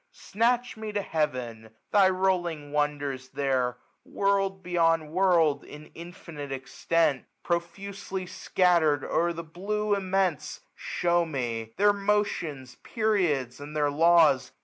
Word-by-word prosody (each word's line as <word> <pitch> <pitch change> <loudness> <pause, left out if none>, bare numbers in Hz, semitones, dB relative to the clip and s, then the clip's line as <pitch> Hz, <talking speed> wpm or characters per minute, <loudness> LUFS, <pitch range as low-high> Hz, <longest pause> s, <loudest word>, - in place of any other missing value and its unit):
Snatch 240 +3 0
me 220 -1 -5
to 205 - 0
heaven; 125 -9 -3 0.2
thy 195 -2 +5
rolling 175 -6 -1
wonders 145 -3 -2
ttiercji 130 -3 0 0.3
World 195 -1 0
beyond 165 -3 +1
world, 170 -5 +3
in 150 +1 -12
infinite 165 -4 -9
extent. 135 +2 0 0.2
Profusely 185 +2 -4
scattered 170 -6 +2
o'er 170 +1 +1
the 170 0 -6
blue 205 +6 -2
immense,. 190 -5 -1
Shew 175 0 0
me; 115 -6 -4
ijieir 205 +1 +5
motions, 175 -10 -1
periods, 175 - 0
and 145 +1 -9
their 145 -1 +2
law^. 160 -4 +4
170 Hz, 115 wpm, -27 LUFS, 145-190 Hz, 0.3 s, thy